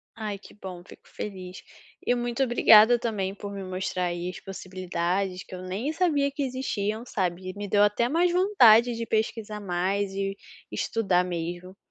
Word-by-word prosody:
Ai 210 Hz, -3 st, -4 dB
que 200 Hz, -, -16 dB
bom, 185 Hz, -3 st, -9 dB
fico -, -, -16 dB
feliz. 185 Hz, -2 st, -7 dB, 0.4 s
E -, -, +3 dB
muito 240 Hz, +2 st, -1 dB
obrigada 235 Hz, -1 st, +6 dB
também 205 Hz, -5 st, -2 dB
por 200 Hz, 0 st, -7 dB
me 195 Hz, -1 st, -6 dB
mostrar 185 Hz, 0 st, -2 dB
aí 175 Hz, +1 st, -3 dB
as 180 Hz, -, -8 dB
possibilidades 185 Hz, 0 st, -3 dB
que -, -, -14 dB
eu 180 Hz, -, -8 dB
nem 195 Hz, +10 st, -3 dB
sabia 295 Hz, -6 st, +1 dB
que 280 Hz, 0 st, -3 dB
existiam, 235 Hz, -4 st, -2 dB
sabe. 185 Hz, -3 st, -2 dB
Me 205 Hz, 0 st, -5 dB
deu 205 Hz, +1 st, +4 dB
até 220 Hz, +4 st, +2 dB
mais 345 Hz, +3 st, +2 dB
vontade 245 Hz, -, +5 dB
de 230 Hz, 0 st, -4 dB
pesquisar 215 Hz, -1 st, -2 dB
mais 195 Hz, +2 st, -1 dB
e 195 Hz, 0 st, -2 dB, 0.4 s
estudar 195 Hz, -6 st, +1 dB
mesmo. 175 Hz, +1 st, -5 dB
200 Hz, 165 wpm, -26 LUFS, 185-235 Hz, 0.4 s, obrigada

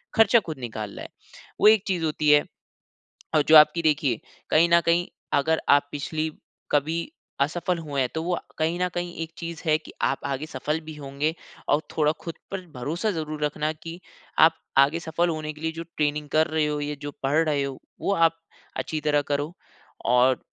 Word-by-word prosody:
ख़र्चा 225 Hz, +1 st, +6 dB
ख़ुद 155 Hz, -4 st, -5 dB
निकाल 110 Hz, -4 st, -5 dB
रहा -, -, -7 dB
है, -, -, -9 dB, 0.5 s
वो -, -, +7 dB
एक 215 Hz, -2 st, +6 dB
चीज़ 175 Hz, -4 st, 0 dB
होती 150 Hz, -1 st, 0 dB
है। 145 Hz, 0 st, +6 dB, 0.9 s
और 150 Hz, -, +5 dB
जो 160 Hz, -, +8 dB
आपकी 160 Hz, +2 st, +6 dB
देखिए 145 Hz, -7 st, +1 dB, 0.3 s
कहीं 165 Hz, +2 st, +5 dB
न 170 Hz, -, +8 dB
कहीं 170 Hz, +1 st, +2 dB, 0.3 s
अगर 160 Hz, +3 st, +2 dB
आप 145 Hz, 0 st, +5 dB
पिछली 155 Hz, +2 st, -2 dB, 0.4 s
कभी 155 Hz, +3 st, +1 dB, 0.4 s
असफल 175 Hz, +5 st, 0 dB
हुए 145 Hz, -4 st, -2 dB
हैं, 125 Hz, -, 0 dB
तो 160 Hz, -, -1 dB
वो 180 Hz, +1 st, -1 dB
आ -, -, -4 dB, 0.2 s
कहीं 165 Hz, +2 st, 0 dB
न 180 Hz, -, +2 dB
कहीं 175 Hz, 0 st, -3 dB
एक 165 Hz, -, -9 dB
चीज़ 170 Hz, -1 st, -6 dB
है 155 Hz, -1 st, +4 dB
कि 155 Hz, -, -13 dB
आप 135 Hz, -, +2 dB
आगे 140 Hz, +2 st, -2 dB
सफल 150 Hz, +3 st, -2 dB
भी 155 Hz, -1 st, -8 dB
होंगे 145 Hz, +2 st, -2 dB, 0.4 s
और 150 Hz, -, +3 dB, 0.2 s
थोड़ा 150 Hz, -1 st, +4 dB
ख़ुद 165 Hz, -, -5 dB, 0.2 s
पर 195 Hz, -1 st, -3 dB
भरोसा 165 Hz, -, -1 dB
ज़रूर 155 Hz, -3 st, -4 dB
रखना 150 Hz, +1 st, -1 dB
कि 165 Hz, +2 st, -7 dB, 0.4 s
आप 160 Hz, 0 st, +7 dB, 0.2 s
आगे 145 Hz, +5 st, +4 dB
सफल 170 Hz, +1 st, 0 dB
होने 155 Hz, -1 st, -3 dB
के 150 Hz, -, -15 dB
लिए 160 Hz, 0 st, -1 dB
जो 165 Hz, +1 st, -5 dB
ट्रेनिंग 150 Hz, 0 st, 0 dB
कर 160 Hz, +1 st, +4 dB
रहे 155 Hz, -1 st, +1 dB
हो 150 Hz, 0 st, -1 dB
या 145 Hz, 0 st, -3 dB
जो 145 Hz, 0 st, -5 dB
पढ़ 140 Hz, +3 st, +2 dB
रहे 145 Hz, -2 st, +1 dB
हो, 135 Hz, -1 st, -5 dB, 0.2 s
वो 200 Hz, -, +1 dB
आप 165 Hz, -2 st, +3 dB, 0.4 s
अच्छी 155 Hz, -, -2 dB
तरह 150 Hz, -1 st, +2 dB
करो। 145 Hz, +2 st, -1 dB, 0.5 s
और 125 Hz, +2 st, +4 dB
155 Hz, 200 wpm, -25 LUFS, 145-165 Hz, 0.9 s, जो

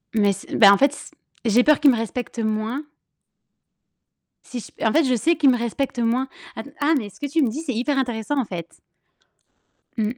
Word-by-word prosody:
Mais 205 Hz, -2 st, +3 dB
c'est 195 Hz, -, -8 dB
bah 200 Hz, -2 st, +8 dB
en -, -, +3 dB
fait 280 Hz, +1 st, +3 dB
s -, -, -11 dB, 0.3 s
j'ai 235 Hz, +3 st, +4 dB
peur 300 Hz, -1 st, +4 dB
qu'ils 290 Hz, -2 st, +6 dB
me -, -, +1 dB
respectent 230 Hz, +1 st, -5 dB
moins 220 Hz, +6 st, -2 dB, 1.6 s
si 245 Hz, -, -7 dB
j -, -, -11 dB
en 220 Hz, -, +3 dB
fait, 320 Hz, -, +4 dB
je 255 Hz, -2 st, +1 dB
sais 330 Hz, +9 st, +2 dB
qu'ils 290 Hz, -3 st, +4 dB
me 245 Hz, -, +3 dB
respectent 240 Hz, +2 st, -3 dB
moins. 240 Hz, +3 st, 0 dB, 0.3 s
Att 225 Hz, -, -7 dB
ah 300 Hz, +3 st, +2 dB
mais 210 Hz, -5 st, -4 dB
ce -, -, -20 dB
que 290 Hz, -, -4 dB
tu 320 Hz, +2 st, +1 dB
me 240 Hz, -, +1 dB
dis, 290 Hz, +8 st, -5 dB
c'est 275 Hz, -6 st, -3 dB
hyper 270 Hz, +5 st, -1 dB
intéressant, 250 Hz, +2 st, -1 dB
en 250 Hz, -, 0 dB
fait. 170 Hz, -3 st, -8 dB, 1.2 s
Mmh. 225 Hz, +2 st, -2 dB
245 Hz, 210 wpm, -22 LUFS, 220-280 Hz, 1.6 s, bah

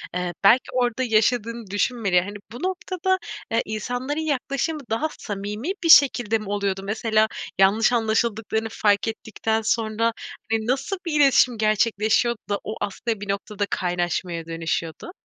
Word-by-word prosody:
eee, 180 Hz, -1 st, -2 dB
belki 230 Hz, +6 st, +6 dB
orada 250 Hz, 0 st, 0 dB
yaşadığını 230 Hz, 0 st, +1 dB
düşünmeleri. 205 Hz, -3 st, +1 dB
Hani 200 Hz, +3 st, -7 dB
bu 240 Hz, +8 st, -8 dB
noktada, 375 Hz, 0 st, -1 dB, 0.3 s
eee, 230 Hz, +1 st, +2 dB
insanların 245 Hz, +7 st, -3 dB
yaklaşımı 290 Hz, +1 st, -1 dB
daha 225 Hz, +8 st, 0 dB
samimi 210 Hz, -, -4 dB
bir 330 Hz, -, +1 dB
şekilde 245 Hz, -8 st, +6 dB
mi 215 Hz, -2 st, -8 dB
oluyordu? 200 Hz, -1 st, -1 dB
Mesela 220 Hz, +1 st, +1 dB, 0.3 s
yanlış 215 Hz, +5 st, +4 dB
anlaşıldıklarını 225 Hz, -1 st, 0 dB
fark 205 Hz, +1 st, +2 dB
ettikten 220 Hz, 0 st, -2 dB
sonra 225 Hz, +1 st, 0 dB, 0.4 s
hani, 220 Hz, 0 st, 0 dB
nasıl 275 Hz, +10 st, -1 dB
bir 305 Hz, -3 st, 0 dB
iletişim 255 Hz, -3 st, +4 dB
gerçekleşiyordu 215 Hz, +2 st, +2 dB
da 205 Hz, -, 0 dB
o 215 Hz, -, -5 dB
aslında, 215 Hz, +2 st, -3 dB
bir 205 Hz, -, -7 dB
noktada 205 Hz, +1 st, -2 dB
kaynaşmaya 175 Hz, -1 st, -2 dB
dönüşüyordu? 165 Hz, -, -4 dB
220 Hz, 140 wpm, -23 LUFS, 205-245 Hz, 0.4 s, belki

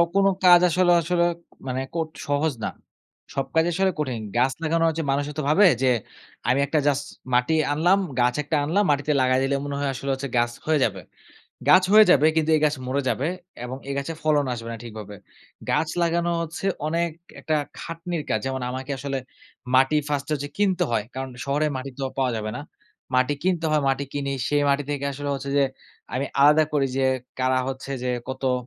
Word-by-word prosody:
কোনো 195 Hz, 0 st, +5 dB, 0.2 s
কাজ 175 Hz, -1 st, +9 dB
আসলে 180 Hz, +1 st, +3 dB
আসলে 170 Hz, +1 st, +1 dB, 0.4 s
মানে 130 Hz, +1 st, -2 dB
কোট 160 Hz, -1 st, -1 dB, 0.2 s
সহজ 145 Hz, +1 st, +1 dB
না। -, -, 0 dB, 0.6 s
সব 135 Hz, -1 st, -1 dB
কাজ 160 Hz, +1 st, +4 dB
আসলে 190 Hz, +2 st, +1 dB
কঠিন। 125 Hz, -6 st, -2 dB, 0.2 s
গাছ 130 Hz, +2 st, +3 dB
লাগানো 165 Hz, +1 st, +1 dB
হচ্ছে 160 Hz, 0 st, -2 dB
মানুষও 145 Hz, +2 st, -1 dB
তো -, -, +1 dB
ভাবে 195 Hz, +6 st, +6 dB, 0.2 s
যে 130 Hz, -, +4 dB, 0.6 s
আমি 130 Hz, -, +3 dB
একটা 150 Hz, +2 st, +1 dB
জাস্ট 140 Hz, 0 st, +1 dB, 0.3 s
মাটি 125 Hz, +6 st, +3 dB, 0.2 s
আনলাম 175 Hz, +6 st, +3 dB, 0.2 s
গাছ 125 Hz, 0 st, +3 dB
একটা 150 Hz, +1 st, 0 dB
আনলাম। 175 Hz, +8 st, +2 dB
মাটিতে 145 Hz, +1 st, +1 dB
লাগায় 130 Hz, 0 st, +3 dB
দিলে 135 Hz, +1 st, +1 dB
মনে 140 Hz, -, -3 dB
হয় 140 Hz, -1 st, 0 dB
আসলে 135 Hz, +3 st, -5 dB
হচ্ছে 135 Hz, 0 st, -4 dB
গাছ 120 Hz, 0 st, +2 dB
হয়ে 155 Hz, -2 st, +2 dB
যাবে। 95 Hz, -4 st, -1 dB, 0.7 s
গাছ 185 Hz, 0 st, +8 dB
হয়ে 215 Hz, 0 st, +9 dB
যাবে 150 Hz, -2 st, +6 dB
কিন্তু 160 Hz, 0 st, +2 dB
এই -, -, 0 dB
গাছ 150 Hz, 0 st, +2 dB
মরে 140 Hz, +2 st, 0 dB
যাবে 130 Hz, +5 st, 0 dB, 0.4 s
এবং 130 Hz, +2 st, -5 dB
এই 140 Hz, -, -2 dB
গাছে 140 Hz, +4 st, -3 dB
ফলন 150 Hz, -2 st, +3 dB
আসবে 115 Hz, 0 st, -7 dB
না 115 Hz, -, -5 dB
ঠিকভাবে। 105 Hz, -3 st, -8 dB, 0.6 s
গাছ 160 Hz, -, +1 dB
লাগানো 170 Hz, +1 st, +1 dB
হচ্ছে 165 Hz, +4 st, -5 dB, 0.2 s
অনেক 170 Hz, +2 st, 0 dB, 0.3 s
একটা 155 Hz, -, -1 dB, 0.2 s
খাটনির 165 Hz, 0 st, -5 dB
কাজ। -, -, +2 dB
যেমন 130 Hz, -1 st, -2 dB
আমাকে 130 Hz, +2 st, -6 dB
আসলে 135 Hz, 0 st, -3 dB, 0.6 s
মাটি 135 Hz, +4 st, +4 dB
ফার্স্ট 145 Hz, -2 st, -1 dB
হচ্ছে 145 Hz, -1 st, -2 dB
কিনতে 190 Hz, -3 st, +2 dB
হয়। 110 Hz, -2 st, +1 dB
কারণ 130 Hz, 0 st, -4 dB
শহরে 145 Hz, +2 st, +1 dB
মাটি 135 Hz, +1 st, -5 dB
তো -, -, -5 dB, 0.2 s
পাওয়া 130 Hz, -2 st, +1 dB
যাবে 110 Hz, 0 st, -3 dB
না। -, -, -5 dB, 0.5 s
মাটি 130 Hz, +3 st, +3 dB
কিনতে 175 Hz, -3 st, 0 dB
হয়, 155 Hz, -1 st, +3 dB
মাটি 135 Hz, +1 st, 0 dB
কিনি 140 Hz, -1 st, -2 dB, 0.2 s
সেই 145 Hz, 0 st, +2 dB
মাটি 140 Hz, +1 st, +2 dB
থেকে 140 Hz, -1 st, -2 dB
আসলে 145 Hz, +1 st, -5 dB
হচ্ছে 140 Hz, +1 st, -5 dB
যে -, -, +5 dB, 0.5 s
আমি 135 Hz, +2 st, -1 dB
আলাদা 150 Hz, +2 st, +6 dB
করি 140 Hz, -2 st, +2 dB
যে 135 Hz, -, +1 dB, 0.4 s
কারা 130 Hz, 0 st, +2 dB
হচ্ছে 135 Hz, +1 st, -6 dB
যে 125 Hz, -, -2 dB, 0.2 s
কত 130 Hz, 0 st, -1 dB
145 Hz, 195 wpm, -24 LUFS, 130-160 Hz, 0.7 s, কাজ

